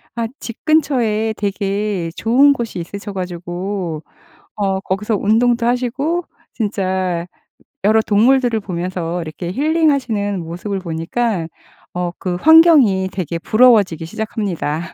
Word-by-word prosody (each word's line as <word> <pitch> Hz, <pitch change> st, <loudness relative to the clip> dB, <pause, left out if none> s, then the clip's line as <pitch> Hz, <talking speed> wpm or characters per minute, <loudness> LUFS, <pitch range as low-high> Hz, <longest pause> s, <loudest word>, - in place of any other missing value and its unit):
아 230 Hz, -1 st, -1 dB
집 230 Hz, -, -9 dB
근처에 240 Hz, -9 st, +1 dB
되게 200 Hz, -2 st, -2 dB
좋은 270 Hz, +5 st, +4 dB
곳이 235 Hz, -8 st, -5 dB
있으셔 200 Hz, +4 st, -7 dB
가지고 180 Hz, -2 st, -4 dB, 0.5 s
어 195 Hz, -2 st, -1 dB
거기서 205 Hz, +3 st, -1 dB
운동도 230 Hz, +4 st, +2 dB
하시고 260 Hz, +8 st, -1 dB, 0.3 s
진짜 185 Hz, -5 st, -2 dB, 0.6 s
여러 215 Hz, +2 st, +4 dB
동물들을 235 Hz, +2 st, +3 dB
보면서 180 Hz, -2 st, -4 dB
이렇게 170 Hz, +2 st, -6 dB
힐링하시는 265 Hz, -, +1 dB
모습을 175 Hz, +5 st, -4 dB
보니까 170 Hz, +3 st, -2 dB, 0.5 s
어 180 Hz, -1 st, -2 dB
그 180 Hz, -2 st, -2 dB
환경이 285 Hz, -, +6 dB
되게 170 Hz, -3 st, -4 dB
부러워지기 210 Hz, -7 st, +3 dB
시작합니다. 185 Hz, -5 st, -3 dB
205 Hz, 275 characters per minute, -18 LUFS, 180-235 Hz, 0.6 s, 환경이